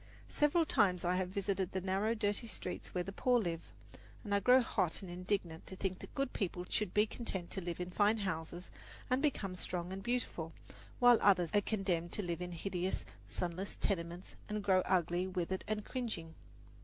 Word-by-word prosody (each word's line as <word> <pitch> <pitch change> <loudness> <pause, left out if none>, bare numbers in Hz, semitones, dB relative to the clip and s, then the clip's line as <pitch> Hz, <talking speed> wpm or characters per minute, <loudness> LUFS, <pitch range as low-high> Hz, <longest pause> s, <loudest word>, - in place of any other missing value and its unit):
Several 300 +3 +3
times 185 - +3
I 180 +1 +3
have 185 -1 0
visited 195 -1 -1
the 190 - 0
narrow, 195 +5 +1
dirty 210 +1 0
streets 185 - -5
where 180 - -1
the 195 - -5
poor 250 +5 +3
live, 170 -5 -1 0.6
and 205 -3 -2
I 200 - +5
grow 250 +6 +7
hot 195 -7 0
and 180 - -7
indignant 180 -2 -2
to 190 - -6
think 190 -1 -2
that - - -11
good 275 -2 -1
people 180 -3 -2
should 210 -4 -1
be 210 +1 +4
content 195 -6 -3
to 190 - -1
live 170 -1 -4
in 180 0 -3
fine 210 +4 +4
houses 175 -3 -3 0.4
and 255 +1 +3
become 210 -11 0
strong 180 0 -3
and 195 - -5
beautiful, 195 -8 -2 0.4
while 245 -2 +7
others 180 -4 +5
are 205 - +5
condemned 190 -5 -1
to 210 - -1
live 170 -1 -2
in 180 0 -4
hideous, 180 +1 -2 0.2
sunless 180 +3 -2
tenements 175 -1 -2
and 210 -1 -2
grow 190 -2 +5
ugly, 180 0 +2
withered 185 0 -2
and 215 -1 -2
cringing. 215 -11 -3
190 Hz, 190 wpm, -35 LUFS, 175-210 Hz, 0.6 s, grow